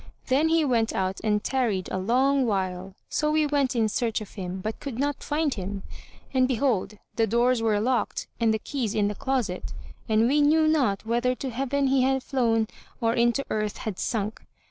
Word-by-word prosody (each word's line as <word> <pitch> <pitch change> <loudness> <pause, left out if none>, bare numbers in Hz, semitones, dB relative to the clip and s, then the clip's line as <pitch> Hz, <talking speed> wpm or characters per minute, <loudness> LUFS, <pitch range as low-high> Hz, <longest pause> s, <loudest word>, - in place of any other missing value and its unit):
Then 285 +5 +3
he 325 -1 +3
went 230 -4 +1
out 190 0 -1
and 210 -1 +1
tarried 230 -8 0
a 190 - -1
long 260 +6 +2
while. 190 -2 -2
So 300 - 0
we 310 0 +3
went 280 -3 +1
in 225 -2 +2
search 230 +1 -1
of 215 -3 -10
him, 185 -2 -5
but 215 +4 -4
could 275 -5 -6
not 285 +1 -1
find 300 -1 0
him; 195 0 -5 0.5
and 255 -1 +3
behold, 235 -5 0 0.2
the 225 -1 +3
doors 240 +2 +2
were 215 -2 +2
locked 245 +3 0
and 230 -1 +3
the 220 - +1
keys 235 -2 -3
in 205 -1 +2
the - - -2
closet, 250 -6 -2 0.4
and 220 +1 +4
we 290 +3 +3
knew 310 +2 +4
not 260 -11 +1
whether 240 +2 +1
to 265 0 -5
heaven 275 +3 0
he 265 0 +3
had 265 0 +1
flown 230 -5 +1 0.3
or 230 -2 +1
into 240 +3 +2
earth 215 -1 -1
had 210 -4 -5
sunk. 215 -1 -2
235 Hz, 195 wpm, -26 LUFS, 210-270 Hz, 0.5 s, and